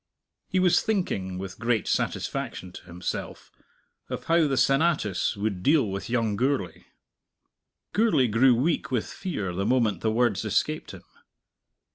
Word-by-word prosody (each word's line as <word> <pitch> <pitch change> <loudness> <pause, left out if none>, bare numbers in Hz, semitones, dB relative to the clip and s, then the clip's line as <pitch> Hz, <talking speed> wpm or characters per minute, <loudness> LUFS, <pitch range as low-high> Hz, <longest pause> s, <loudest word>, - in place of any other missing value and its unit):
He 185 - -1
was 185 -1 +4
thinking, 100 - -2
with 95 0 -7
great 115 -3 0
satisfaction 90 - -2
to - - -12
himself, 90 0 -6 0.6
of - - -4
how 165 -1 +3
the 135 -2 -1
Senatus 135 - +2
would 100 -3 -2
deal 140 - +3
with 100 +3 -5
young 115 -3 0
Gourlay. 125 -5 -1 1.1
Gourlay 200 - +3
grew 120 +3 +4
weak 150 +8 0
with 125 -4 0
fear 105 - -4
the 95 +3 -2
moment 115 -2 +1
the 110 - +1
words 110 -3 +1
escaped 110 +9 -1
him. - - -13
115 Hz, 140 wpm, -26 LUFS, 100-145 Hz, 1.1 s, was